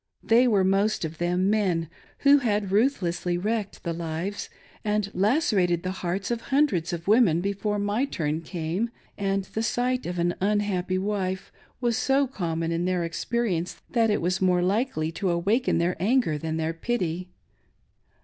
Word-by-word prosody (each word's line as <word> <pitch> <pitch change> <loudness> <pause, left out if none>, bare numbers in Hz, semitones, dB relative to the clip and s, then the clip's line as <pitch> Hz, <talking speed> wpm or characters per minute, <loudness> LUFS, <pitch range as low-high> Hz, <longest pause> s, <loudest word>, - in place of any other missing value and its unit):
They 240 +3 +5
were 205 -5 +3
most' 195 0 +2
of 160 0 -7
them 180 +3 +1
men 185 -6 +1 0.4
who 285 +1 +8
had 210 -6 0
ruthlessly 180 -6 +1
wrecked 210 +2 -2
the 170 - -2
lives 170 +4 -4 0.3
and 210 -1 0
lacerated 195 - +2
the 185 - -2
hearts 185 +5 -2
of 235 -1 -1
hun 280 +2 +5
dreds 180 - -2
of 170 0 -5
women 205 -7 +5
before 200 +2 -1
my 205 +6 0
turn 160 - -2
came, 170 +6 -2 0.3
and 195 -1 0
the 220 +3 -4
sight 250 +1 0
of 180 0 -4
an 175 0 +1
unhappy 195 -2 0
wife 190 -1 -2 0.3
was 240 -2 +1
so 275 +1 +2
common 165 -9 -2
in 170 +1 0
their 180 -1 0
experience 175 +1 -2
that 230 -2 +3
it 210 - +1
was 180 +2 0
more 180 -1 +3
likely 190 -5 0
to 185 +3 -2
awaken 200 +9 +1
their 170 +2 +1
anger 215 -3 +2
than 160 +2 -3
their 160 0 -1
pity. 180 -2 -2
190 Hz, 165 wpm, -26 LUFS, 175-220 Hz, 0.4 s, who